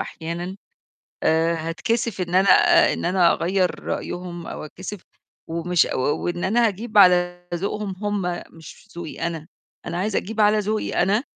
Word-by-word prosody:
أحيانًا. 170 +3 -5 0.7
آآ، 165 +1 +2
هاتكسف 190 +7 -2
إن 175 -1 -3
أنا 190 +1 +4 0.4
إن - - -4
أنا 180 -1 +4
أغيّر 180 +1 0
رأيهم 175 -1 -5
أو - - -6
اتكسف 190 +5 -8 0.5
ومش 170 +1 +1
و - - -1
وإن 175 +6 -1
أنا 230 +5 +3
هاجيب 215 +1 -1
على 175 -2 +4
ذوقهم 200 +2 -3
هُم 195 -4 -2
مش 165 +5 -14
ذوقي 170 -2 -7
أنا. 165 -2 -5 0.4
أنا 170 - -3
عايزة 200 +3 0
أجيب 220 +2 -5
على 210 0 +5
ذوقي 210 -2 0
أنا 205 +5 +2
180 Hz, 150 wpm, -23 LUFS, 170-205 Hz, 0.7 s, على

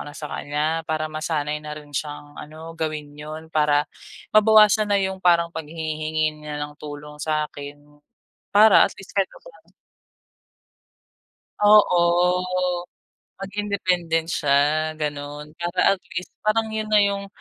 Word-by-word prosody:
na - - -14
sa 150 - -6
kanya 145 +1 -3 0.2
para 155 0 -1
masanay 155 -1 -2
na 150 0 -7
rin 145 -1 -15
siyang 145 0 -5
ano, 160 +2 -9
gawin 155 -2 -4
yon. 155 +2 -8
Para 150 -1 +3 0.5
mabawasan 215 0 +6
na 200 - +4
yung 190 0 -2
parang 170 -1 +3
paghingi-hingi 155 -1 -3
niya 150 -1 -6
ng 145 0 -5
tulong 150 0 -9
sa'kin 145 -2 -3 0.7
para 210 0 +7
at - - -12
least 195 - -12
kahit 195 - +4
papaano - - -17 1.9
oo, 205 -4 +6 1.4
maging 200 +2 -4
independent 175 -5 0
siya, 140 -3 +2 0.4
gano'n. 145 0 -4
Para 175 +3 +2
at 190 - -14
least, 180 +2 -4
parang 220 +1 +1
yon 220 0 -2
na 215 -1 +5
yung 200 0 -1
155 Hz, 130 wpm, -23 LUFS, 150-195 Hz, 1.9 s, para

